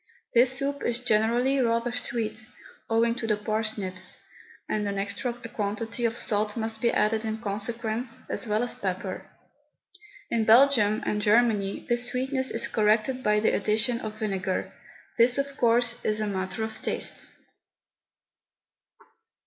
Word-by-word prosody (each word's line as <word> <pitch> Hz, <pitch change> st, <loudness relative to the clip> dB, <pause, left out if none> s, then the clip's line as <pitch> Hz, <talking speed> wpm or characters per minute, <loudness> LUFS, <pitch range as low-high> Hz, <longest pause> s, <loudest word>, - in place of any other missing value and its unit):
This 255 Hz, +2 st, +4 dB
soup 280 Hz, +1 st, -2 dB
is 240 Hz, +1 st, -1 dB
generally 240 Hz, +4 st, +2 dB
rather 235 Hz, -1 st, +1 dB
sweet, 220 Hz, -3 st, -3 dB, 0.4 s
owing 230 Hz, +1 st, +2 dB
to 230 Hz, -1 st, -5 dB
the 210 Hz, -1 st, +1 dB
parsnips, 210 Hz, -4 st, -1 dB, 0.5 s
and 210 Hz, -1 st, -1 dB
an 200 Hz, 0 st, -3 dB
extra 200 Hz, +5 st, -2 dB
quantity 230 Hz, 0 st, -4 dB
of 230 Hz, 0 st, 0 dB
salt 210 Hz, 0 st, 0 dB
must 220 Hz, -1 st, -3 dB
be 235 Hz, -, +3 dB
added 215 Hz, +1 st, +1 dB
in 220 Hz, 0 st, -2 dB
consequence, 225 Hz, +2 st, -2 dB
as -, -, -1 dB
well 215 Hz, +2 st, +1 dB
as 245 Hz, -, 0 dB
pepper. 185 Hz, 0 st, -4 dB, 1.0 s
In 230 Hz, -1 st, +1 dB
Belgium 220 Hz, -2 st, +5 dB
and 210 Hz, -, -1 dB
Germany 210 Hz, -2 st, +2 dB
this 240 Hz, 0 st, +3 dB
sweetness 260 Hz, +1 st, -1 dB
is 230 Hz, -, +3 dB
corrected 215 Hz, +4 st, +1 dB
by 210 Hz, -2 st, +2 dB
the 220 Hz, -, +2 dB
addition 220 Hz, +4 st, +1 dB
of 215 Hz, 0 st, -6 dB
vinegar. 190 Hz, -3 st, -2 dB, 0.5 s
This, 240 Hz, +2 st, +5 dB
of 275 Hz, 0 st, -2 dB
course, 240 Hz, 0 st, +2 dB
is 215 Hz, 0 st, 0 dB
a 215 Hz, -, 0 dB
matter 190 Hz, +1 st, -3 dB
of 220 Hz, 0 st, -6 dB
taste. -, -, -2 dB
225 Hz, 140 wpm, -26 LUFS, 210-240 Hz, 1.0 s, Belgium